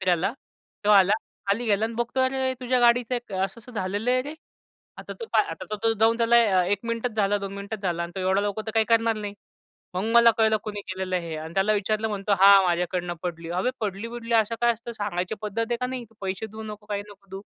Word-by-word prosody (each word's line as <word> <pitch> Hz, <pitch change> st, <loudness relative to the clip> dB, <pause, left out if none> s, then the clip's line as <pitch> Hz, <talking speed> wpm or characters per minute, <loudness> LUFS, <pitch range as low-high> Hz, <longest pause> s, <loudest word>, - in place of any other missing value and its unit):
फिरायला. 185 Hz, +2 st, +1 dB, 0.5 s
तो 210 Hz, -, +3 dB
आला, 195 Hz, -1 st, +6 dB, 0.3 s
खाली 205 Hz, +5 st, 0 dB
गेला 210 Hz, 0 st, +2 dB
आणि 225 Hz, +1 st, -3 dB
बघतोय, 240 Hz, +3 st, 0 dB
"अरे 260 Hz, 0 st, 0 dB
तुझ्या 255 Hz, 0 st, +1 dB
गाडीचं 240 Hz, +1 st, +3 dB
क -, -, -12 dB
असं-असं 195 Hz, +6 st, -4 dB
झालेलं 205 Hz, +2 st, -1 dB
आहे 255 Hz, 0 st, +2 dB
रे." 290 Hz, +3 st, -7 dB, 0.6 s
आता -, -, -7 dB
तो -, -, -3 dB
आता -, -, -1 dB
तर 215 Hz, -, -2 dB
तो 225 Hz, -, +3 dB
जाऊन 225 Hz, +1 st, +4 dB
त्याला 230 Hz, -5 st, +4 dB
1 200 Hz, +2 st, +1 dB
मिनिटच 230 Hz, +1 st, -2 dB
झाला, 205 Hz, -1 st, +2 dB
2 195 Hz, -1 st, -5 dB
मिनिट 200 Hz, +2 st, -6 dB
झाला 175 Hz, -3 st, -1 dB
आणि 170 Hz, 0 st, -6 dB
तो 190 Hz, -, -4 dB
एवढा 190 Hz, +1 st, +2 dB
लवकर 205 Hz, +1 st, -2 dB
तर -, -, -2 dB
काही 225 Hz, -, +4 dB
करणार 230 Hz, -1 st, +3 dB
नाही. 205 Hz, -1 st, -5 dB, 0.6 s
मग 185 Hz, +2 st, -1 dB
मला 235 Hz, 0 st, +8 dB
कळलं 220 Hz, -1 st, +4 dB
कुणी 210 Hz, -1 st, -4 dB
केलेलं 185 Hz, 0 st, -2 dB
आहे 170 Hz, -2 st, -4 dB
हे 160 Hz, -, -4 dB
आणि 160 Hz, +2 st, -7 dB
त्याला 195 Hz, +2 st, +3 dB
विचारलं 215 Hz, +2 st, 0 dB
म्हणतो, 205 Hz, -1 st, -2 dB
"हां 195 Hz, 0 st, +8 dB
माझ्याकडनं 175 Hz, 0 st, -1 dB
पडली." 165 Hz, -2 st, -5 dB
"अबे 250 Hz, -, +1 dB
पडली-बीडली 230 Hz, +3 st, -3 dB
असं 225 Hz, 0 st, +3 dB
काय 240 Hz, 0 st, +4 dB
असतं? 235 Hz, +1 st, -8 dB
सांगायची 205 Hz, -3 st, -3 dB
पद्धत 210 Hz, +1 st, -4 dB
आहे 240 Hz, -, +1 dB
का 250 Hz, -, 0 dB
नाही? 255 Hz, -1 st, -5 dB
तू -, -, -24 dB
पैसे 190 Hz, +2 st, -3 dB
देऊ 220 Hz, +1 st, -9 dB
नको, 210 Hz, -1 st, -9 dB
काही 205 Hz, -1 st, -3 dB
नको 200 Hz, -1 st, -16 dB
देऊ." 195 Hz, +1 st, -7 dB
210 Hz, 230 wpm, -25 LUFS, 190-230 Hz, 0.6 s, मला